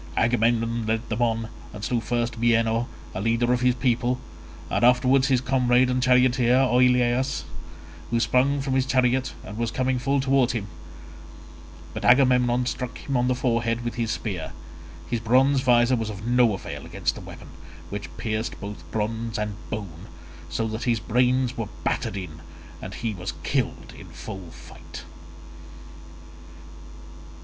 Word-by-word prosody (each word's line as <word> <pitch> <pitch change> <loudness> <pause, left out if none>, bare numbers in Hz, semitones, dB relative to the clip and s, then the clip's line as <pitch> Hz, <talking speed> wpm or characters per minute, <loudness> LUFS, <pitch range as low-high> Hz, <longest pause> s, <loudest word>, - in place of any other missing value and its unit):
Agamemnon 115 -1 +1
led 110 +1 -1
them 110 +1 -2
on, 115 -1 +1 0.3
and 105 -1 -8
slew 120 +2 0
first 120 0 -2
Bienor, 115 0 +2 0.3
a 95 - -4
leader 115 +3 +2
of 125 - 0
his 125 -1 +3
people, 125 0 0 0.5
and - - -1
afterwards 130 +2 +4
his 130 -3 +2
comrade 125 -1 +3
and 125 0 0
charioteer 125 -1 +4
Oileus, 125 0 +3 0.7
who 115 - +1
sprang 135 +4 +2
from 135 -1 -2
his 130 0 +1
chariot 130 0 +1
and 105 +4 -8
was 115 -1 0
coming 130 +2 0
full 140 +2 +1
towards 135 -2 +2
him; 110 -4 -3 1.3
but - - -5
Agamemnon 125 -1 +4
struck 125 0 -4
him 140 - -4
on 125 0 +2
the 125 - +2
forehead 120 -2 0
with 120 - -2
his 115 -2 -2
spear; 95 - -4 0.5
his 120 - -1
bronze 130 +4 +3
visor 120 -1 +4
was 115 -2 -3
of 105 0 -7
no 120 -3 +3
avail - - -7
against - - -2
the - - -10
weapon, - - -11 0.4
which 100 -2 -5
pierced 110 +3 -3
both 100 +1 -7
bronze 115 +1 -2
and 105 -1 -2 0.2
bone, 100 -4 -6 0.4
so 85 +8 -1
that 110 +1 -4
his 120 -3 +2
brains 125 +2 +1
were - - -3
battered 100 - -1
in 85 -4 -7 0.4
and 95 - -7
he 115 -2 -3
was 90 -3 -5
killed 130 +2 -2
in - - -12
full 95 -3 -8
fight. - - -12
120 Hz, 155 wpm, -25 LUFS, 110-125 Hz, 1.3 s, afterwards